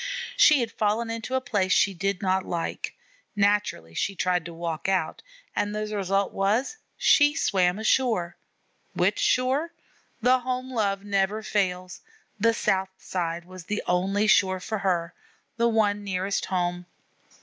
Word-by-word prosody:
She 300 -4 +6
had 230 -1 -2
fallen 220 +2 0
into 230 +3 -4
a 260 - +1
place 205 -7 0
she 195 +1 +4
did 195 +2 -2
not 190 0 +1
like; 170 -1 -4 0.4
naturally 205 - +1
she 195 - -2
tried 180 -2 0
to 170 - -7
walk 165 +1 -4
out, 185 -5 -1 0.3
and 205 +1 -1
the 215 0 -3
result 195 0 0
was 210 - +1
that 445 - -16 0.2
she 290 0 +4
swam 180 - +2
ashore. 220 -6 +1 0.6
Which - - +1
shore? 270 +7 +1 0.5
The 255 +2 +4
home 255 +1 -4
love 200 -4 0
never 200 +1 0
fails: 185 -4 -2 0.4
the 230 +2 +3
south 190 -3 0
side 170 -2 -4
was 185 -1 -11
the 210 +3 -3
only 195 +4 +1
shore 190 -3 +3
for 215 +3 -4
her, 175 -3 -1 0.4
the 235 0 +3
one 205 -2 +1
nearest 195 0 -2
home. 175 -1 -2
200 Hz, 150 wpm, -26 LUFS, 185-225 Hz, 0.6 s, She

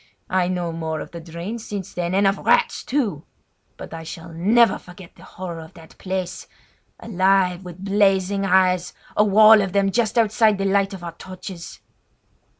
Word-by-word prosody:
I 185 -1 +2
know 175 -2 -2
more 160 -1 -4
of - - -8
the 170 - -8
drains 170 +8 -7
since 200 -4 -6
then, 175 +1 -2
and 200 +1 +3
of 195 +1 +2
rats, 485 0 +2
too! 220 - -2 0.5
but - - -9
I 165 - -6
shall 165 +1 -9
never 215 +7 +3
forget 180 -1 -14
the - - -18
horror 175 -2 -7
of 160 0 -12
that 165 -2 -15
place—alive 185 0 -2
with 180 +1 -9
blazing 195 -1 +2
eyes, 185 -2 +2 0.2
a 210 - +4
wall 215 +1 +7
of 195 -1 -3
them 200 -1 +2
just 230 +1 0
outside 220 -1 +3
the 195 - -2
light 195 0 +1
of 180 - -11
our 170 - -5
torches. 185 0 -10
190 Hz, 170 wpm, -22 LUFS, 175-200 Hz, 0.5 s, wall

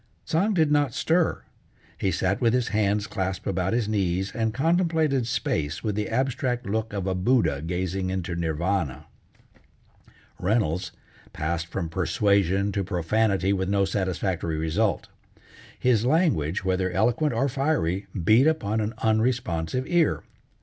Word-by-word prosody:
Tsang 195 +6 +1
did 160 -4 +3
not 145 -4 +2
stir; 165 +1 +1 0.5
he 95 - -1
sat 95 +4 0
with 115 -2 +3
his 125 -2 0
hands 105 -1 +1
clasped 95 -2 -3
about 95 -1 -1
his 115 -2 0
knees, 95 -2 0
and 110 -1 0
contemplated 160 -3 +1
space 80 -8 -2
with 105 - -1
the 105 +1 -2
abstract 125 0 -1
look 110 +2 -2
of 100 -2 -3
a 95 - 0
Buddha 90 - +1
gazing 90 +3 -2
into 95 -2 -3
Nirvana. 80 -3 -1 1.3
Reynolds 90 -3 0 0.4
passed 80 +2 -2
from 85 0 -3
persuasion 100 +2 +1
to 100 0 -1
profanity 95 +2 +1
with 95 -1 -1
no 100 -1 +2
satisfactory 95 -4 -2
result. 85 +7 0 0.7
His 120 -4 +2
language, 120 - +1
whether 95 0 +1
eloquent 120 - +1
or 135 - +1
fiery, 125 - -1 0.2
beat 115 - +5
upon 110 -9 0
an 110 +1 -3
unresponsive 110 -2 0
ear. 170 -1 +1
100 Hz, 135 wpm, -25 LUFS, 90-125 Hz, 1.3 s, beat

